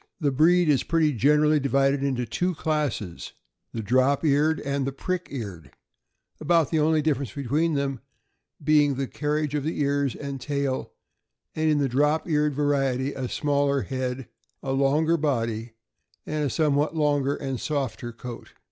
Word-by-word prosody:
The 145 -3 +1
breed 170 +5 +4
is 145 -3 +3
pretty 160 -3 +1
generally 150 +5 +3
divided 135 0 +2
into 130 -3 -1
two 180 +10 -1
classes, 150 - -3 0.4
the 115 - -5
drop 130 +7 +2
eared 150 +2 +3
and 140 -1 -2
the - - -1
prick 180 +6 -3
eared, 100 - -7 0.7
about 165 0 +2
the 160 - +2
only 155 0 +2
difference 140 -6 0
between 145 +4 0
them 140 -2 -1 0.6
being 145 -2 +4
the 135 +1 -2
carriage 150 +1 -2
of 145 -2 -1
the 160 +2 -3
ears 140 -2 0
and 140 -2 -6
tail, 140 -2 -2 0.6
and 155 0 0
in 150 - +3
the 140 -1 +2
drop 150 +6 +1
eared 150 -3 +1
variety 135 -2 0
a 130 -2 -4
smaller 140 -2 +1
head, 130 +2 -4 0.4
a 135 - -2
longer 145 +5 +2
body, 115 -6 -2 0.5
and 155 -1 -2
a - - 0
somewhat 150 +2 +1
longer 145 -2 +1
and 135 -3 -4
softer 135 -5 -3
coat. 120 +1 -9
140 Hz, 155 wpm, -25 LUFS, 135-150 Hz, 0.7 s, breed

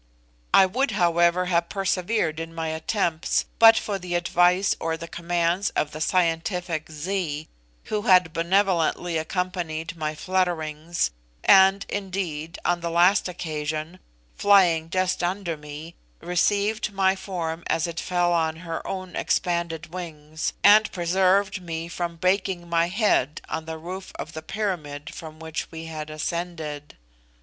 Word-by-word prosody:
I 190 - +7
would, 255 +9 0
however, 175 0 +3
have 170 -1 +1
persevered 190 -3 0
in 165 0 -6
my 165 -1 -2
attempts, 160 +1 0
but 225 0 +9
for 200 -2 -2
the 175 -1 -4
advice 175 +2 +3
or 165 0 -2
the 165 +1 -7
commands 175 +3 0
of 150 - 0
the 155 - -7
scientific 170 -1 0
Zee, 155 -1 -3 0.4
who 210 -1 -2
had 180 -6 +4
benevolently 175 -1 +1
accompanied 170 -1 -3
my 155 -1 -3
flutterings, 170 - -1 0.3
and, 195 0 +6
indeed, 180 -5 -4
on 175 0 +1
the 170 - -2
last 180 +3 +4
occasion, 155 0 -4 0.4
flying 175 -5 +4
just 185 +1 0
under 175 -1 -1
me, 150 +2 -9 0.3
received 205 +5 +1
my 190 -1 +2
form 170 -4 -4
as 165 -1 +1
it 170 0 -4
fell 175 -1 +1
on 160 -2 +1
her 165 -1 -3
own 185 -1 -5
expanded 170 -2 -1
wings, 155 -3 -5
and 215 +1 +7
preserved 190 +2 +2
me 165 -1 -5
from 170 0 -4
breaking 185 0 0
my 170 0 +2
head 185 - +1
on 160 0 -3
the 160 0 -5
roof 185 +4 -7
of 165 - -6
the 160 - -6
pyramid 155 -7 -4
from 155 -1 -9
which 160 0 -5
we 165 0 -8
had 155 -1 -6
ascended. 155 -2 -4
170 Hz, 140 wpm, -25 LUFS, 160-185 Hz, 0.4 s, but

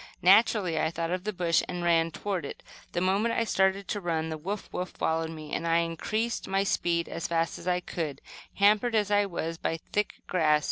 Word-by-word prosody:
Naturally 190 -3 +5
I 160 - +2
thought 165 0 -3
of 180 +1 -2
the 215 - 0
bush, 175 -4 +2
and 180 -1 -4
ran 165 -1 +3
toward 190 0 -3
it. 140 - -7 0.3
The 175 - 0
moment 200 +5 +2
I 230 - +2
started 195 -2 +1
to 205 - -2
run 160 -2 -1
the 160 - -3
"woof, 195 +6 -4
woof!" 180 0 -3
followed 160 0 -1
me, 155 -2 -8
and 170 - -1
I 165 0 +4
increased 190 +8 -1
my 195 0 +1
speed 170 -3 0
as 165 - -4
fast 165 0 0
as 170 - -10
I 180 0 +1
could, 155 -6 -4 0.4
hampered 210 +4 +4
as 210 -1 +2
I 205 0 +3
was 165 -2 -4
by - - -1
the 165 - -7
thick 210 0 0
grass. 155 -4 +3
175 Hz, 220 wpm, -28 LUFS, 165-200 Hz, 0.4 s, Naturally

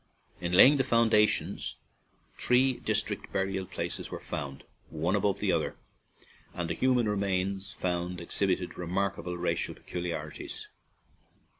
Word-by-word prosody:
In 85 0 -3
laying 135 +10 +8
the 135 - +3
foundations, 115 -4 +2 0.6
three 125 +1 +3
distinct 110 -1 -1
burial 95 -1 -1
places 85 -2 -3
were - - -5
found, 70 -3 -5 0.3
one 80 +5 0
above 100 -1 +1
the 100 -2 +1
other, 80 -2 0 0.8
and 85 -2 -2
the - - +1
human 125 -3 +2
remains 100 -1 -1
found 90 0 -2
exhibited 90 +1 -1
remarkable 90 -1 -2
racial 90 - -1
pecu 90 - -6
liarities. 80 -3 -5
95 Hz, 125 wpm, -30 LUFS, 85-105 Hz, 0.8 s, laying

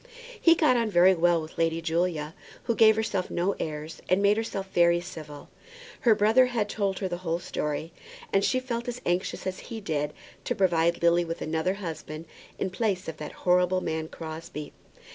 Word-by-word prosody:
He 335 -1 +7
got 300 -7 +4
on 230 -2 +1
very 185 0 +6
well 175 -1 +3
with 155 - -10
Lady 165 0 +1
Julia, 165 -2 -1 0.3
who 235 - 0
gave 220 -1 +6
herself 210 -4 -1
no 185 +3 0
airs, 155 0 -5
and 185 - +4
made 200 +1 +4
herself 215 -3 -3
very 170 0 +4
civil. 160 -5 -9 0.5
Her 230 -3 +4
brother 220 +5 +5
had 230 -4 -1
told 200 -3 -1
her 190 - -2
the 175 -1 -3
whole 165 -2 -1
story, 155 -1 -4 0.4
and 195 - +3
she 255 - +2
felt 240 -1 -4
as 245 0 -4
anxious 175 +2 -1
as 185 0 -3
he 230 - -5
did 150 -7 -2 0.3
to - - -1
provide 170 -2 +2
Lily 170 +1 +4
with 165 0 -5
another 160 +4 0
husband 165 -4 -6 0.3
in 190 - -2
place 190 -2 -1
of 160 -1 -5
that 150 - -6
horrible 180 0 +4
man 160 -1 -2
Crosbie. 160 -2 -7
180 Hz, 185 wpm, -27 LUFS, 165-205 Hz, 0.5 s, He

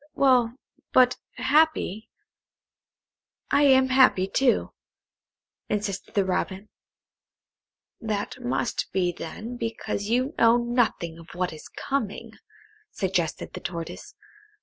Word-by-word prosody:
"Well, 250 -3 +3 0.4
but 250 -1 +5 0.2
happy; 255 - +1 1.4
I 285 - +4
am 265 -1 +5
happy, 255 -8 +5
too," 245 +6 +1 1.0
insisted 205 -2 -3
the 200 -2 +3
Robin. 190 +2 -2 1.3
"That 215 +2 -3
must 245 -1 -2
be 180 -2 +1
then 215 +9 -7
because 225 -3 -3
you 255 +5 +1
know 230 +1 +6
nothing 235 -9 0
of 165 +1 -13
what 180 -1 -1
is 155 - -11
coming," 230 -4 -3 0.6
suggested 180 -5 -2
the - - -6
Tortoise. 170 -1 -7
225 Hz, 105 wpm, -26 LUFS, 190-255 Hz, 1.4 s, know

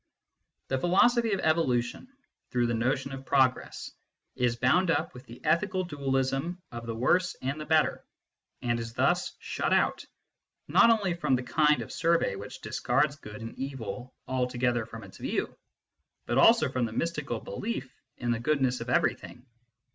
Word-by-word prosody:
The 135 - 0
philosophy 225 - +3
of 195 - 0
evolution, 130 - +1 0.4
through 120 -2 +1
the 120 - 0
notion 130 +4 0
of 135 0 -7
progress, 130 -2 +1 0.4
is 120 -2 +1
bound 140 +10 +3
up 165 - 0
with 125 - -12
the 120 - -12
ethical 185 +4 +1
dualism 140 +1 -1
of 120 0 -7
the 115 - -3
worse 175 +10 +2
and 140 +4 -2
the 150 - -7
better, 155 -1 +2 0.6
and 120 -1 0
is 115 0 -6
thus 160 +8 +1
shut - - -3
out, - - +2 0.6
not - - +6
only 210 -6 +3
from 150 -6 +1
the 125 - -2
kind 150 +4 +3
of - - -11
survey 165 - +1
which 100 +1 -9
discards 150 -1 +1
good 105 -6 -10
and 115 0 -6
evil 125 -2 -6
alto 125 -1 -1
gether 120 -2 +1
from 115 -2 -9
its 95 - -13
view, - - -2 0.7
but 120 +2 +1
also 230 +9 +6
from 130 -2 -1
the 110 - -8
mystical 150 -6 -2
belief 140 - -5 0.2
in 120 -1 -1
the 115 - 0
goodness 130 -1 +1
of - - -5
everything. 125 - 0
135 Hz, 165 wpm, -28 LUFS, 120-165 Hz, 0.7 s, not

